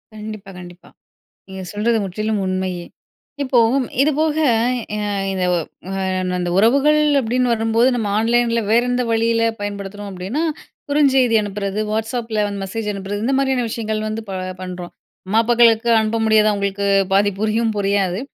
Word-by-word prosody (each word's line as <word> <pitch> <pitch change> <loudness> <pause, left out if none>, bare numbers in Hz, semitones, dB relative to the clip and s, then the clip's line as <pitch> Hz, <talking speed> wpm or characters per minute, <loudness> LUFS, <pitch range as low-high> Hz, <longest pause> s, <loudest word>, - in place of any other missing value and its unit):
கண்டிப்பா, 215 -2 -8
கண்டிப்பா. 175 0 -13 0.6
நீங்க 190 0 -7
சொல்றது 220 +3 +1
முற்றிலும் 215 +3 -2
உண்மையே. 185 -1 -2 0.6
இப்போ, 260 -2 +1 0.4
இதுபோக 305 +1 +1 0.6
ய - - -3 0.3
இது 185 -1 -1
ஒ - - +2 0.5
அன் 185 -1 -1
அந்த 175 -1 -2
உறவுகள் 280 +8 +4 0.2
அப்படின்னு 250 +1 0
வரும்போது, 225 +2 +2
நம்ம 220 -4 -2
ஆன்லைன்ல 235 +1 +2
வேற 230 +2 +4
எந்த 245 0 +1
வழியில 230 0 +2 0.2
பயன்படுத்துறோம் 205 0 -6
அப்படின்னா, 190 - -3 0.5
குறுஞ்செய்தி 270 -5 +3
அனுப்புறது, 200 0 -3
வாட்ஸ்அப்பில 225 0 -1
வந்து 200 -1 -5
மெசேஜ் 210 +2 -4
அனுப்புறது, 200 +1 -5
இந்த 270 - +1
மாரியான 265 -2 +1
விஷயங்கள் 215 -1 -3
வந்து 220 +1 -4
ப - - -5 0.3
பண்ணுறோம். 180 -1 -7 0.3
அம்மா, 210 +4 +1
அப்பாக்களுக்கு 235 0 +4
அனுப்ப 220 +1 -1
முடியாது. 215 -1 +4
அவங்களுக்கு 200 0 -2 0.3
பாதி 205 +1 +4
புரியும் 220 +1 +1
புரியாது. 195 -1 0
215 Hz, 140 wpm, -19 LUFS, 195-235 Hz, 0.6 s, உறவுகள்